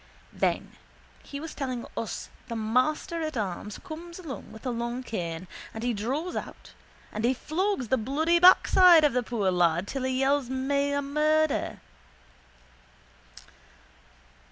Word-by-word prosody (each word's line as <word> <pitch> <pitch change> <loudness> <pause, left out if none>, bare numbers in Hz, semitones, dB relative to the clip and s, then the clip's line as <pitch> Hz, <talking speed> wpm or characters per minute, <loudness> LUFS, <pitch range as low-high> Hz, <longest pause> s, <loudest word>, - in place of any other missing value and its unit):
Then - - 0 0.5
he 280 - -7
was 320 +2 -7
telling 255 -4 -4
us 225 - -4 0.2
the 235 - -4
master 255 +9 0
at 310 -4 -3
arms 205 0 -4
comes 340 +2 -8
along 325 -7 -8
with 220 - -12
a 250 - 0
long 235 +2 -3
cane 175 -6 -4 0.3
and 220 - -5
he 245 0 +1
draws 270 - -2
out - - -7 0.4
and 215 - -4
he 250 +3 +3
flogs 320 - -1
the 260 - +3
bloody 310 +9 +1
backside 360 -1 +7
off - - +5
of - - -9
the 250 - +2
poor 215 -5 0
lad 175 +1 +2
till 270 - -3
he 260 0 0
yells 275 -1 +2
meila 280 +2 0
murder. 305 +1 +1
260 Hz, 145 wpm, -27 LUFS, 230-310 Hz, 0.5 s, backside